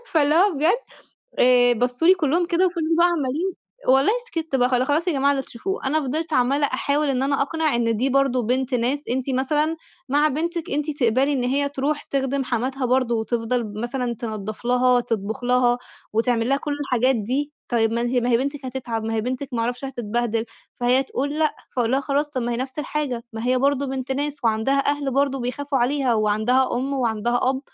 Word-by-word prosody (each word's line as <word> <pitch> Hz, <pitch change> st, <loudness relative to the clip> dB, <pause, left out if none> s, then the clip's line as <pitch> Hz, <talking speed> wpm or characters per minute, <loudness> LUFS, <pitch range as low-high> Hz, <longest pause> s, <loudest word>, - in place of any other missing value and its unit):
فاللي 300 Hz, -2 st, +2 dB
هو 370 Hz, +2 st, +4 dB
بجد 325 Hz, -, +2 dB, 0.6 s
آآ، 245 Hz, -1 st, +5 dB
بصّوا 245 Hz, +7 st, +1 dB
لي 375 Hz, -, +8 dB
كلّهم 340 Hz, +1 st, +1 dB
كده 365 Hz, +2 st, +2 dB
وفِضلوا 330 Hz, -2 st, 0 dB
بقى 345 Hz, -, +6 dB
عمّالين 330 Hz, +2 st, -1 dB, 0.4 s
والله 270 Hz, +10 st, +5 dB
سكِتّ، 320 Hz, -, -2 dB
بقى 250 Hz, -1 st, +3 dB
خلا 255 Hz, 0 st, +2 dB
خلاص 305 Hz, +6 st, +1 dB
يا 350 Hz, -, +3 dB
جماعة 275 Hz, 0 st, +2 dB
اللي 270 Hz, -1 st, -1 dB
تشوفوه، 365 Hz, -, -5 dB
أنا 305 Hz, +4 st, +2 dB
فضلت 310 Hz, +4 st, -3 dB
عمّالة 275 Hz, +3 st, +2 dB
أحاول 285 Hz, +3 st, 0 dB
إن 265 Hz, -1 st, 0 dB
أنا 275 Hz, 0 st, +1 dB
أقنع 315 Hz, 0 st, 0 dB
إن 230 Hz, -2 st, +1 dB
دي 255 Hz, +5 st, +1 dB
برضه 270 Hz, -2 st, +2 dB
بنت 255 Hz, +3 st, 0 dB
ناس 255 Hz, +5 st, -1 dB
أنتِ 260 Hz, +2 st, -1 dB
مثلًا 300 Hz, +5 st, 0 dB, 0.3 s
مع 290 Hz, +3 st, +3 dB
بنتِك 330 Hz, +3 st, -3 dB
أنتِ 295 Hz, +2 st, -1 dB
تقبلي 255 Hz, +5 st, +3 dB
إن 255 Hz, -3 st, 0 dB
هي 280 Hz, +3 st, +1 dB
تروح 290 Hz, +2 st, -2 dB
تخدِم 270 Hz, 0 st, -1 dB
حماتها 255 Hz, +2 st, -1 dB
برضه، 250 Hz, -1 st, +2 dB
وتفضل 230 Hz, +1 st, -1 dB
ب 210 Hz, -2 st, -7 dB
مثلًا 240 Hz, +1 st, -2 dB
تنضّف 215 Hz, -2 st, -6 dB
لها 250 Hz, 0 st, +3 dB
تطبخ 225 Hz, 0 st, -3 dB
لها، 245 Hz, 0 st, +3 dB, 0.3 s
وتعمل 230 Hz, +1 st, +1 dB
لها 275 Hz, -, +3 dB
كُلّ 295 Hz, +1 st, -4 dB
الحاجات 255 Hz, -2 st, +1 dB
دي، 260 Hz, +7 st, -2 dB, 0.2 s
طيب 225 Hz, -2 st, +1 dB
ما 235 Hz, -, 0 dB
أنتِ 240 Hz, +1 st, -1 dB
ما 245 Hz, 0 st, +1 dB
هي 235 Hz, -, +5 dB
بنتِك 280 Hz, +3 st, -3 dB
هتتعب 240 Hz, -4 st, -4 dB
ما 225 Hz, -, -2 dB
هي 220 Hz, -, +1 dB
بنتِك 255 Hz, +4 st, -3 dB
ما 230 Hz, -, -1 dB
اعرفش 245 Hz, +3 st, -3 dB
هتتبهدِل، 235 Hz, -3 st, -2 dB, 0.3 s
فهي 250 Hz, +2 st, +2 dB
تقول 285 Hz, +3 st, -3 dB
لأ، 310 Hz, -1 st, +2 dB, 0.2 s
فاقول 235 Hz, -2 st, +1 dB
لها 270 Hz, -, +3 dB
خلاص 285 Hz, +2 st, -1 dB
طَب 260 Hz, -4 st, -3 dB
ما 240 Hz, +1 st, -1 dB
هي 235 Hz, -, -1 dB
نفس 260 Hz, +3 st, -5 dB
الحاجة، 290 Hz, -5 st, -2 dB
ما 225 Hz, +2 st, -4 dB
هي 255 Hz, 0 st, +3 dB
برضه 280 Hz, +1 st, +1 dB
بنت 265 Hz, 0 st, -3 dB
ناس، 290 Hz, +2 st, -2 dB
وعندها 230 Hz, +5 st, +2 dB
أهل 285 Hz, -2 st, -2 dB
برضه 275 Hz, -1 st, +1 dB
بيخافوا 275 Hz, +3 st, -2 dB
عليها، 255 Hz, 0 st, +1 dB
وعندها 220 Hz, +5 st, +2 dB
أُم 270 Hz, +3 st, -2 dB
وعندها 240 Hz, -2 st, 0 dB
أب 265 Hz, 0 st, -3 dB
260 Hz, 205 wpm, -23 LUFS, 240-285 Hz, 0.6 s, لي